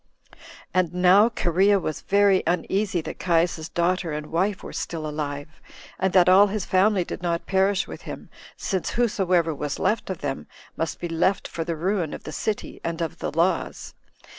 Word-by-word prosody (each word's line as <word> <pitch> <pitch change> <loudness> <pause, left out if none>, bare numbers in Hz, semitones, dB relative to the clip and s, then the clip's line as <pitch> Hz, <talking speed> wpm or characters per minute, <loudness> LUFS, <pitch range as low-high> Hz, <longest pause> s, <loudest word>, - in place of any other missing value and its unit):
4. - - -20 0.4
And 180 -2 +1
now 185 +5 +6
Cherea 195 -1 +2
was 155 -5 -4
very 200 -1 +3
uneasy 185 +1 0
that - - -7
Caius's 165 -2 +1
daughter 175 0 0
and 150 0 -5
wife 185 +4 0
were - - -8
still 160 -2 -4
alive, 145 -1 -4 0.5
and 190 0 +1
that 180 -2 +6
all 190 +3 +7
his 205 -1 -3
family 190 0 +3
did - - -6
not 170 -1 -1
perish 190 0 +1
with - - -9
him, - - -9 0.3
since 190 -3 -2
whosoever 185 -8 +2
was 145 -1 -4
left 215 -2 0
of 185 - -4
them 135 -2 -4 0.3
must 165 -1 -3
be 175 - -3
left 170 +4 0
for 165 - -4
the 165 0 -3
ruin 180 0 -1
of - - -11
the - - -7
city 210 +7 -4
and 170 0 -3
of 165 -3 -3
the - - -3
laws. 170 +3 -1
180 Hz, 185 wpm, -24 LUFS, 165-195 Hz, 0.5 s, all